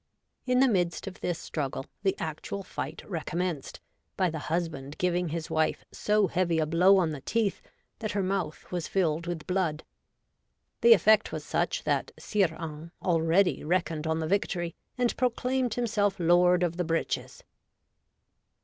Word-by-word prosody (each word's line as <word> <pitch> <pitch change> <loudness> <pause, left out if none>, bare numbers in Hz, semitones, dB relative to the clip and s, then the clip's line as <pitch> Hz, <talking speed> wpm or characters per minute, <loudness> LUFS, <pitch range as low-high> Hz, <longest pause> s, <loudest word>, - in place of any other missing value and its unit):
In 250 0 +4
the 270 - +6
midst 180 -7 0
of 195 -1 -8
this 175 -2 -1
struggle 140 -5 -4 0.2
the 195 -1 +1
actual 160 +5 -4
fight 160 -3 -6
recom 170 -4 -5
menced, 175 -6 -2 0.4
by 185 -3 +2
the 160 - -4
husband 155 -4 -2
giving 180 -1 0
his 160 0 -4
wife 155 0 0
so 210 -1 +2
heavy 180 -3 +1
a 160 - +2
blow 180 +5 +5
on 170 -4 +2
the 145 -3 -6
teeth, 220 - 0 0.4
that 215 -2 -3
her 200 -1 0
mouth 185 -6 -3
was 175 -3 -2
filled 170 -3 0
with 170 -3 -4
blood. 180 -5 -1 1.0
The 235 0 +9
effect 215 +2 +4
was - - -5
such - - -1
that - - 0
Sire 205 -3 +1
Hains 160 0 -6
already 170 +2 +2
reckoned 160 -2 0
on 160 0 +1
the 160 -1 -2
victory, 175 -2 0 0.2
and 245 -1 +1
proclaimed 250 0 0
himself 210 -5 0
lord 175 +1 +4
of 170 -1 -1
the 180 - +1
breeches. 165 0 -2
175 Hz, 160 wpm, -28 LUFS, 160-195 Hz, 1.0 s, The